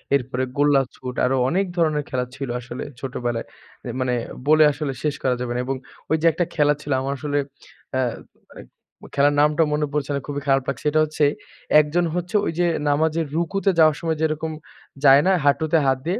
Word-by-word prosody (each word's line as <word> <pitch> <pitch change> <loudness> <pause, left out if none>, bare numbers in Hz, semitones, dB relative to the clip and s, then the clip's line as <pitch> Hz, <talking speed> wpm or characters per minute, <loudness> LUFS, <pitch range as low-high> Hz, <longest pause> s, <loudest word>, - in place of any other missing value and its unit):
এরপরে 130 -1 -1
গোল্লাছুট 135 -3 +1
আরো 130 +1 +1
অনেক 195 +4 +1
ধরনের 155 -3 +1
খেলা 125 -1 -1
ছিল 135 -3 -5
আসলে 125 0 -7 0.2
ছোটবেলায়। 120 -3 -3 0.4
এ - - -4
মানে 125 -1 0 0.3
বলে 155 +1 +6
আসলে 145 -1 -4
শেষ 150 -2 0
করা 130 -1 +2
যাবে 125 -1 -3
না। 125 - -1
এবং 135 - -2 0.4
ওইযে 160 +1 +1
একটা 175 +2 -1
খেলা 150 -1 +4
ছিল 145 - -6
আমার 135 +1 -2
আসলে 145 0 -2 0.6
অ্যা 130 0 +1 0.5
মানে - - -12 0.5
খেলার 145 +1 +3
নামটা 150 +2 +3
মনে 150 0 +1
পড়ছে 145 -1 -1
না। - - -1
খুবই 145 -1 -4
খারাপ 135 -1 +3
লাগছে। 140 +2 -5
এটা 155 - +2
হচ্ছে 155 -1 0 0.5
একজন 155 +4 +1
হচ্ছে 175 +3 -3
ঐ - - -1
যে 175 - +3 0.2
নামাজের 160 +2 +1
রুকুতে 195 +4 0
যাওয়ার 155 -2 +6
সময় 160 -2 -1
যেরকম 160 0 -1 0.5
যায় 140 +1 +8
না, 190 - +5
হাঁটুতে 155 +3 +3
হাত 130 -1 +2
দিয়ে? 190 +5 0
145 Hz, 185 wpm, -22 LUFS, 135-160 Hz, 0.6 s, যায়